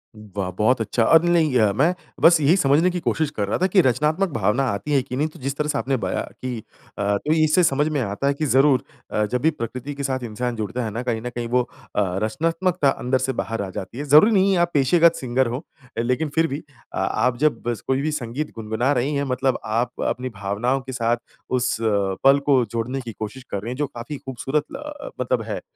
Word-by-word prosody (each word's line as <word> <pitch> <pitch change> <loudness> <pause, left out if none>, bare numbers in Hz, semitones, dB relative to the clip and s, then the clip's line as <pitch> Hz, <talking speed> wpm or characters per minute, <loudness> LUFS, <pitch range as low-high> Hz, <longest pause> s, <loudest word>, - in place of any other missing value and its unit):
वाह! 100 -3 -5
बहुत 115 +2 +3
अच्छा, 115 +2 +1
अब 165 +7 +6
नहीं 170 -3 +3
गया 110 -5 +3
मैं, 155 - +3 0.3
बस 170 -1 +7
यही 155 +6 +5
समझने 150 +4 +4
की 180 - -2
कोशिश 155 -2 0
कर 100 -1 0
रहा - - 0
था 185 - +2
कि 185 0 +5
रचनात्मक 150 +9 +1
भावना 115 +5 +1
आती 100 +9 -4
हैं 135 - +4
कि 125 -2 -6
नहीं। 150 +3 +1
तो 155 - -13
जिस 135 +2 -3
तरह 150 - 0
से - - 0
आपने 135 0 0
बयाँ 95 -4 -2 0.2
की 125 -2 -3 0.4
अ, 100 0 +1
तो 150 +9 0
इससे 155 +4 +4
समझ 145 0 +2
में 150 -2 -1
आता 105 +6 -2
है 140 - +3
कि 155 +2 -2
ज़रूर 135 -1 +4 0.3
अ, 105 - +1
जब 125 +3 -2
भी 160 - +4
प्रकृति 130 +2 -5
के 140 - -5
साथ 130 -2 -2
इंसान 120 +2 -3
जुड़ता 110 +3 -3
है 110 - -3
ना, 115 +4 -3
कहीं 115 -3 -1
ना 125 - -4
कहीं 120 -1 -4
वो 125 +1 +2 0.3
अ, 105 - +3 0.2
रचनात्मकता 165 - +1
अंदर 130 0 0
से 130 0 -1
बाहर 115 -2 -4
आ 95 - -4
जाती 95 +5 -7
है। 145 - -3
ज़रूरी 155 +11 +7
नहीं 195 -1 +4
है, - - +2
आप 175 0 +2
पेशेगत 165 +4 +4
सिंगर 130 0 0
हों, 125 +5 -3 0.4
लेकिन 125 +6 0
फिर 165 0 +3
भी 140 +1 -4 0.3
अ, - - -4
आप 125 -1 +1
जब 150 -5 +1
बस 120 -2 -2
कोई 135 +1 +1
भी 155 +1 -1
संगीत 140 +1 -4
गुनगुना 115 +4 -1
रहीं 140 +4 0
हैं 140 - 0
मतलब 130 0 0
आप 120 +3 -1
अपनी 130 +1 -2
भावनाओं 120 +7 0
के 130 0 -8
साथ 120 -1 +1 0.3
उस 125 0 +1 0.5
पल 135 +1 +6
को 135 -4 +4
जोड़ने 120 +4 -2
की 120 -2 -7
कोशिश 110 +4 -6
कर 100 - -2
रहीं 115 - -5
हैं 125 - -5
जो 145 -1 0
काफ़ी 130 +2 -7
खूबसूरत 135 +3 -2
ल 295 +1 -7
मतलब - - 0
है। - - -4
130 Hz, 235 wpm, -22 LUFS, 115-150 Hz, 0.5 s, बस